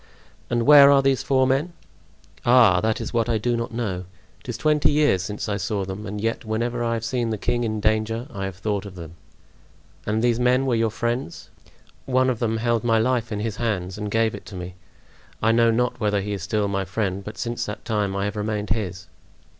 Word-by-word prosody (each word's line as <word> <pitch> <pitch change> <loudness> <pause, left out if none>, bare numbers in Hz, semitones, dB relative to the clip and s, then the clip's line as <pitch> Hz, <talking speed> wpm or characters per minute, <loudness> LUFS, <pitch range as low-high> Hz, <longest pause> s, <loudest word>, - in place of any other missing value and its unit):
"And 120 -1 +1
where 145 -1 +9
are 140 -1 +5
these 135 -1 +2
four 130 -1 +2
men?" 135 +7 0 0.7
"Ah, 120 -7 +5
that 110 +2 0
is 115 - -5
what 115 0 +1
I 115 - +2
do 120 +3 0
not 115 0 -3
know. 100 -6 -3 0.3
It - - -13
is 115 - -3
twenty 150 +3 +2
years 145 -11 +3
since 105 +4 -5
I 105 -1 -1
saw 100 0 -2
them, 95 +3 -6
and 105 +1 -5
yet 115 +4 -2
whenever 120 +2 -2
I 115 0 0
have 115 0 -4
seen 120 -1 -1
the 110 - -2
king 120 +3 -1
in 110 -2 -2
danger 110 +2 0
I 95 -1 -4
have 95 -1 -5
thought 100 +1 -3
of 95 - -11
them." 85 -2 -9 0.9
"And 110 +2 0
these 120 -1 +2
men 125 +2 +3
were 130 - +1
your 115 -1 +2
friends?" 120 -3 -4 0.6
"One 130 0 +3
of 120 - -4
them 115 -2 0
held 115 0 0
my 115 -1 +3
life 120 0 0
in 105 -1 -2
his 110 -1 -3
hands 95 -6 -2
and 105 -1 -3
gave 115 +1 +1
it - - -9
to 100 - -9
me. 90 0 -6 0.7
I 110 - +3
know 115 0 +4
not 125 +2 0
whether 105 -2 +1
he 105 +1 -4
is 100 - -4
still 105 +3 0
my 100 -1 -1
friend, 95 0 -2
but 105 +1 -8
since 120 0 -3
that 105 +1 -7
time 105 -4 -1
I 100 0 -1
have 105 - -3
remained 105 -1 -2
his." 95 -4 -2
110 Hz, 225 wpm, -23 LUFS, 105-120 Hz, 0.9 s, where